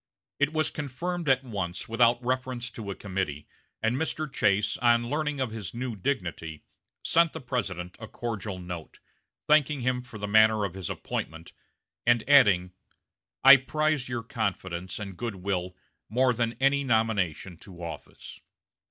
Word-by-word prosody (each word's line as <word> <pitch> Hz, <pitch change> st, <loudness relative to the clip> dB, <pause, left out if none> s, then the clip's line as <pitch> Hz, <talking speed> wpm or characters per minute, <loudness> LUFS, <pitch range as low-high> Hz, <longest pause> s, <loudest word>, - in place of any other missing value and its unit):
It 145 Hz, +1 st, +3 dB
was 155 Hz, 0 st, 0 dB
confirmed 165 Hz, +3 st, -3 dB
at 130 Hz, 0 st, +4 dB
once, 95 Hz, -7 st, -4 dB
without 120 Hz, +1 st, +3 dB
reference 130 Hz, -1 st, -2 dB
to 105 Hz, -3 st, -7 dB
a 100 Hz, -, -3 dB
committee, 95 Hz, -7 st, -4 dB, 0.4 s
and 115 Hz, +2 st, +2 dB
Mr. 155 Hz, 0 st, -3 dB
Chase, 105 Hz, +1 st, +2 dB
on 120 Hz, -1 st, +3 dB
learning 150 Hz, -1 st, -1 dB
of 130 Hz, -4 st, -1 dB
his 110 Hz, -2 st, -6 dB
new 125 Hz, -1 st, -3 dB
dignity, 85 Hz, -, -3 dB, 0.4 s
sent 165 Hz, -1 st, +3 dB
the 160 Hz, -, -5 dB
President 100 Hz, -, -4 dB
a 110 Hz, -, -7 dB
cordial 105 Hz, -5 st, -4 dB
note, 90 Hz, -3 st, -8 dB, 0.5 s
thanking 150 Hz, -2 st, +3 dB
him 125 Hz, 0 st, 0 dB
for 125 Hz, -3 st, -11 dB
the 105 Hz, 0 st, -4 dB
manner 110 Hz, 0 st, +5 dB
of 95 Hz, -, -4 dB
his 95 Hz, -3 st, -5 dB
appointment, 80 Hz, +2 st, -5 dB, 0.5 s
and 120 Hz, -2 st, +3 dB
adding: 105 Hz, -11 st, +5 dB, 0.7 s
"I 135 Hz, +1 st, +11 dB
prize 150 Hz, 0 st, 0 dB
your 120 Hz, -2 st, -3 dB
confidence 95 Hz, -6 st, -3 dB
and 100 Hz, -3 st, -6 dB
good 115 Hz, +1 st, -4 dB
will 90 Hz, -1 st, -3 dB, 0.3 s
more 125 Hz, +3 st, +3 dB
than 115 Hz, 0 st, -1 dB
any 140 Hz, +1 st, +3 dB
nomination 105 Hz, -, 0 dB
to 90 Hz, -1 st, -12 dB
office." 80 Hz, -4 st, -9 dB
115 Hz, 150 wpm, -28 LUFS, 95-130 Hz, 0.7 s, I